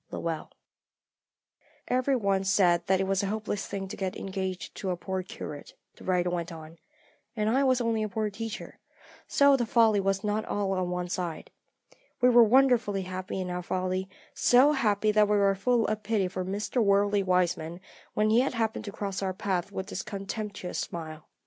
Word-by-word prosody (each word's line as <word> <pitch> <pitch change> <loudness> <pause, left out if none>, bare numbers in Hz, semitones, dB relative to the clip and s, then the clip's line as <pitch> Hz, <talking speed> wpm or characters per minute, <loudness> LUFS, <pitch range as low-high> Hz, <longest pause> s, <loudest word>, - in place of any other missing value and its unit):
LOWELL. 165 -2 -4 1.4
"Every 255 +2 +1
one 200 -5 +1
said 185 -3 +3
that 190 0 +3
it - - +2
was 195 0 +1
a 200 - -1
hopeless 210 -1 -3
thing 195 -1 -4
to - - -5
get 190 -1 -3
engaged 190 -1 -4
to 190 - -3
a 180 - -1
poor 190 +1 -3
curate," 150 -5 -8 0.2
the - - -15
writer 180 -1 +1
went 170 -1 -3
on, 160 0 -11 0.6
"and 215 -2 0
I 260 +5 +3
was 260 -2 +3
only 230 -2 0
a 215 - -1
poor 215 +1 -2
teacher, 225 +2 -7 0.5
so 280 -1 +5
the 255 - +1
folly 220 -3 +4
was 195 +1 0
not 210 +1 0
all 200 -1 -1
on 185 -2 -1
one 180 0 -2
side. 175 -2 -4 0.7
We 250 - +5
were 240 -1 +7
wonderfully 235 -4 +3
happy 185 +1 -5
in 180 -1 -3
our 180 0 -3
folly, 185 +1 -2 0.2
so 255 +4 +5
happy 215 -6 +2
that 210 0 +4
we 210 - +3
were 200 -1 +4
full 230 +4 +1
of 215 0 -1
pity 210 -3 0
for 185 0 -4
Mr. 205 +6 -1
Worldly 200 0 +3
Wiseman 175 -3 0 0.4
when 215 0 +2
he 225 - +5
happened 230 -4 -1
to 205 - -5
cross 200 -1 -4
our 190 -1 -2
path 190 -2 -2
with 190 0 -5
his - - -3
contemptuous 200 -1 -5
smile. 160 -2 -6
195 Hz, 185 wpm, -28 LUFS, 185-220 Hz, 1.4 s, were